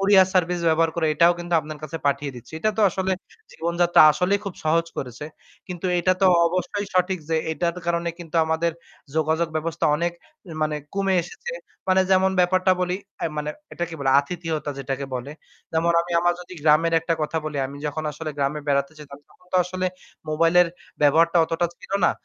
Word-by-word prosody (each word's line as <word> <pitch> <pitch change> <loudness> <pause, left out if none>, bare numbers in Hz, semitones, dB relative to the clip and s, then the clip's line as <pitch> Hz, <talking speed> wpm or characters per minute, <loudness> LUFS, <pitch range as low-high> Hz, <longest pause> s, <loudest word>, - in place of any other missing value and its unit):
courier 195 -1 +6
service 180 -1 +1
ব্যবহার 165 0 +3
করে 160 -2 +1
এটাও 170 +2 +5
কিন্তু 175 0 -3
আপনার 155 0 -8
কাছে 155 +2 -5
পাঠিয়ে 140 0 0
দিচ্ছি। 120 +5 -13
এটা 215 +6 +1
তো - - +4
আসলে 190 +1 -1 0.4
জীবনযাত্রা 170 +1 +2
আসলেই 180 +6 +1
খুব 200 -3 -5
সহজ 165 +2 +2
করেছে। 125 +2 -6 0.4
কিন্তু 180 0 -4
এটা 185 +2 +3
তো - - +7 0.2
অবশ্যই 185 +3 -2
সঠিক 185 +1 +2
যে 160 - +2 0.2
এটার 170 +3 -1
কারণে 170 0 0
কিন্তু 170 -1 -6
আমাদের 160 +1 0 0.4
যোগাযোগ 160 +1 +1
ব্যবস্থা 160 +1 -2
অনেক 170 +2 -1 0.5
মানে 155 0 0 0.2
কমে 195 -1 +1
এসেছে। 475 - -8 0.4
মানে 185 0 +5
যেমন 190 0 +4
ব্যাপারটা 185 +1 +3
বলি 180 0 0 0.2
অ্যা - - -1
মানে 150 0 -2 0.2
এটাকে 175 -1 -4
বলে 135 -1 +2
আতিথিয়তা 160 -1 -4
যেটাকে 135 0 -3
বলে। 125 +2 -4 0.4
যেমন 165 +1 +2
আমি 175 - -7
আমার 175 0 +3
যদি 180 +1 -11
গ্রামের 155 +2 +4
একটা 165 +1 0
কথা 155 +1 -1
বলি, 150 -2 -4
আমি 140 +1 -10
যখন 155 +1 -3
আসলে 155 +1 -5
গ্রামে 140 +2 0
বেড়াতে 140 +1 +1
যেতাম 140 -2 -11
তখন 180 - -25
তো - - +3
আসলে 185 +1 -2 0.4
mobile 165 +3 +2
এর 175 - -2 0.3
ব্যবহারটা 165 +4 +4
অতটা 165 +1 0
ছিল - - -11
না। - - +4
165 Hz, 185 wpm, -23 LUFS, 155-180 Hz, 0.5 s, তো